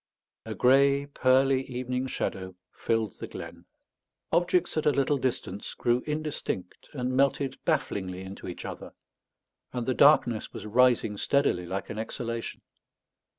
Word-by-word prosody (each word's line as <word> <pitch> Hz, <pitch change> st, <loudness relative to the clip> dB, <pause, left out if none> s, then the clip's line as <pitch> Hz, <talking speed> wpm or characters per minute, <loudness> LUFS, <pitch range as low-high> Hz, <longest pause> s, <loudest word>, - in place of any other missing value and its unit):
A -, -, -4 dB
grey 140 Hz, +2 st, +4 dB
pearly 135 Hz, -1 st, +3 dB
evening 125 Hz, +1 st, -2 dB
shadow 95 Hz, -6 st, -4 dB, 0.2 s
filled 115 Hz, -4 st, -1 dB
the -, -, -5 dB
glen; -, -, -9 dB, 0.7 s
objects 175 Hz, 0 st, +2 dB
at 155 Hz, -1 st, 0 dB
a -, -, +6 dB
little 140 Hz, 0 st, +1 dB
distance 110 Hz, -6 st, -3 dB
grew 120 Hz, +1 st, +1 dB
indistinct 150 Hz, -, -4 dB
and 130 Hz, -2 st, -2 dB
melted 135 Hz, 0 st, +1 dB
bafflingly 95 Hz, -, -1 dB
into 95 Hz, +1 st, -8 dB
each 90 Hz, -, -7 dB
other; -, -, -7 dB, 0.8 s
and 125 Hz, -2 st, -2 dB
the 130 Hz, -, +1 dB
darkness 120 Hz, -6 st, +4 dB
was -, -, -8 dB
rising 115 Hz, -2 st, +3 dB
steadily 100 Hz, -9 st, +1 dB
like 95 Hz, +2 st, -4 dB
an 105 Hz, -, -5 dB
exhalation. 115 Hz, +1 st, -5 dB
125 Hz, 135 wpm, -28 LUFS, 110-140 Hz, 0.8 s, a